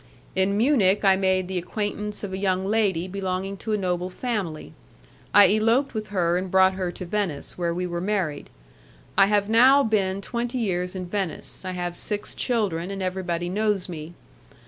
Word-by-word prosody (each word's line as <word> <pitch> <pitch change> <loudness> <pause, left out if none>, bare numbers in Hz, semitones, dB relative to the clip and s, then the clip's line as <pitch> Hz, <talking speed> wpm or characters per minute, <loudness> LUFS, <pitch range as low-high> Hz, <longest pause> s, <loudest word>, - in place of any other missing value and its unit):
In 190 +2 +2
Munich 215 -6 +3
I 190 -1 +6
made 190 -1 +1
the 185 -1 -2
acquaintance 210 +3 -4
of 195 -2 -4
a - - -2
young 190 -1 0
lady 195 -5 +1
belonging 190 0 -3
to 215 +3 -3
a - - +2
noble 180 -2 -1
family; 190 -7 -4 0.6
I 205 0 +7
eloped 230 +6 +2
with 215 -2 -4
her 175 -3 +1
and 185 0 -5
brought 190 +1 +5
her 185 -1 -2
to 185 - -7
Venice, 175 -6 0
where 170 -1 -1
we 180 +2 -2
were 175 -1 -3
married. 185 -7 -2 0.7
I 195 - +6
have 205 -1 +2
now 255 +6 +6
been 195 -4 0
twenty 240 +4 -3
years 180 -5 -1
in 185 -1 -4
Venice. 190 -1 -3
I 185 0 -4
have 175 -1 -3
six 210 +3 -4
children, 195 -8 -1
and 195 -1 -4
everybody 175 -2 -2
knows 205 0 0
me. 165 -1 -8
190 Hz, 180 wpm, -24 LUFS, 180-210 Hz, 0.7 s, I